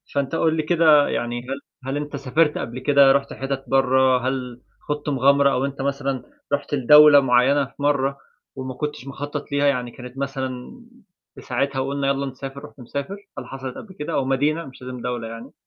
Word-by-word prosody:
فأنت 140 +2 0
قُل 160 0 +2
لي 155 - 0
كده 155 -3 +5
يعني 120 0 -2
هل 135 +1 -4 0.3
هل 135 +2 -2
أنت 145 0 -5
سافرت 145 +3 +1
قبل 120 +2 -5
كده 140 0 +5
رُحت 140 0 +1
حِتَت 135 0 -4
برّه؟ 130 -1 +3
هل 125 -2 -4 0.3
خُضت 150 0 -2
مغامرة 140 +1 +4
أو 130 +2 0
أنت 140 -1 -5
مثلًا 140 -1 -2 0.3
رُحت 145 +1 -2
لدولة 150 +2 +8
معيّنة 135 +2 +3
في - - -18
مرّه، 140 -1 +1 0.4
وما 130 -1 -5
كنتش 140 -1 -5
مخطَّط 145 +1 -6
ليها 145 0 +2
يعني 125 -3 0
كانت 125 +2 -11
مثلًا 135 - -5 0.5
في - - -11
ساعتها، 135 +1 -1
وقُلنا 140 +1 -1
يلّا 140 0 0
نسافر، 135 +2 -7
رُحت 145 - -16
مسافر؟ 140 - -5 0.2
هل - - -8
حصلت 130 -1 -7
قبل 190 -4 -11
كده 150 +2 -4
أو 135 - +1
مدينة 145 +5 0
مش 130 -1 -13
لازم 125 -1 -7
دولة 120 -2 -3
يعني؟ 115 +1 -9
135 Hz, 190 wpm, -22 LUFS, 130-145 Hz, 0.5 s, لدولة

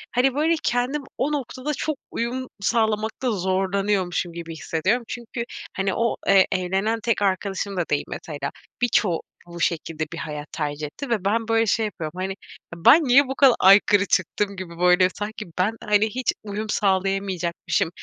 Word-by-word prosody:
hani, 255 +2 +3
böyle, 315 +3 +2
kendim 250 +4 0
o 275 +4 0
noktada 280 +1 -3
çok 305 +1 -2
uyum 250 +2 -3
sağlamakta 220 +3 0
zorlanıyormuşum 190 -2 0
gibi 165 -1 -7
hissediyorum. 185 +10 0
Çünkü, 235 0 -5 0.3
hani, 195 0 -1
o, 235 -1 0
eee, 195 -1 +6
evlenen 195 +5 0
tek 230 -3 +1
arkadaşım 195 0 -1
da 175 - +2
değil 145 - +1
mesela. 145 -3 -5 0.3
Birçoğu 205 -8 +2 0.3
bu 170 0 -9
şekilde 160 -1 -1
bir - - -6
hayat 150 -2 -5
tercih 150 -1 -3
etti 270 - -8
ve 215 -5 -1
ben 225 +3 +1
böyle, 225 0 +3
şey 220 +1 +1
yapıyorum, 165 -6 -5
hani: 190 +1 -2 0.4
"Ben 285 - +6
niye 275 +1 +5
bu 265 - -3
kadar 270 -4 +6
aykırı 200 +1 +6
çıktım?" 200 +2 0
gibi 175 -3 -8
böyle, 180 +1 +5
sanki 215 +1 -5
ben, 205 +5 +2
hani, 210 0 +3
hiç 255 0 0
uyum 210 +1 -5
sağlayamayacakmışım 190 -4 0
200 Hz, 160 wpm, -23 LUFS, 180-235 Hz, 0.4 s, eee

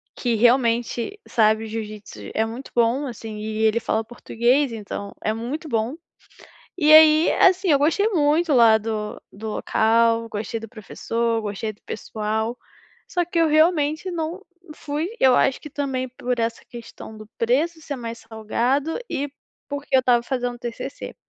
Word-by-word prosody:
que 240 -2 -1
realmente 240 - +1
sabe 220 -1 +3
o - - -7
jiu-jitsu, 215 -1 -7
é 220 - +1
muito 235 +4 -8
bom, 240 +4 +2
assim, 225 -3 -7
e 215 0 -4
ele 220 +1 +3
fala 220 -1 -1
português 240 +4 0
então, 200 -2 -6
é 215 - 0
muito 260 +8 -5
bom. 230 +2 -1 0.8
E 310 -3 +4
aí, 310 +1 +7
assim, 375 0 +4
eu 285 - +5
gostei 330 +9 +2
muito 315 -2 +2
lá 230 -4 +6
do 215 -1 -4
do 220 +2 -7
local, 230 +1 +2
gostei 220 +1 -4
do 225 - -9
professor, 230 +1 -2
gostei 210 +1 -4
do 205 - -27
pessoal, 220 +2 -3 0.5
só 355 -2 +1
que 345 0 -3
eu 330 -1 +4
realmente 310 +2 +2
não 340 +2 -4 0.3
fui 300 +3 -3
Eu 260 -1 +6
acho 270 - +2
que 300 - -9
também 265 -2 -2
por 250 0 -3
essa 230 0 -2
questão 230 -2 -10
do 215 0 -11
preço 305 +8 +1
ser 290 -2 -5
mais 230 -2 -6
salgado 235 - -1
e 285 0 -2 0.4
porque 285 -1 -1
eu - - +6
estava 245 -2 +3
fazendo 245 -1 -3
TCC. 240 +3 -7
240 Hz, 160 wpm, -23 LUFS, 225-290 Hz, 0.8 s, aí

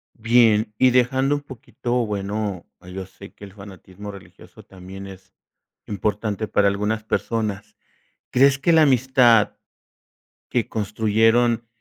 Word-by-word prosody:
Bien, 115 -1 +3
y 130 +2 +4
dejando 130 +3 +2
un 145 - -5
poquito, 125 -2 -4
bueno, 100 -2 -4 0.2
yo 95 +1 -8
sé 100 +1 -14
que - - -16
el 95 - -14
fanatismo 100 0 -11
religioso 100 -2 -15
también 95 +1 -11
es 95 -1 -14 0.5
importante 105 +1 -3
para 100 - +2
algunas 105 +2 -1
personas, 105 -2 -3 0.5
¿crees 135 +2 +4
que 160 +5 +1
la 160 -1 +5
amistad 125 -4 +3 0.9
que 120 -3 -1
construyeron 110 +2 +1
110 Hz, 120 wpm, -22 LUFS, 100-120 Hz, 0.9 s, la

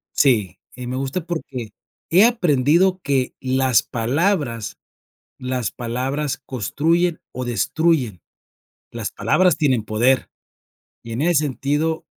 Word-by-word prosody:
si, 110 - +2 0.2
y 125 -1 -7
me 125 - -3
gusta 135 +6 -2
porque, 135 -9 -5 0.4
he 185 +6 +6
aprendido 180 - +3
que, 135 -2 0
las 130 -2 +2
palabras, 125 - -1 0.6
las 125 -3 -2
palabras 130 +4 -3
construyen 160 - 0
o 125 0 -5
destruyen. 125 - 0 0.7
Las - - -4
palabras 180 -4 +2
tienen 130 -8 +1
poder, 120 +5 +1 0.7
y 115 - -8
en 125 +6 -2
ese 165 -3 +3
sentido 145 +4 -1
135 Hz, 115 wpm, -21 LUFS, 125-160 Hz, 0.7 s, he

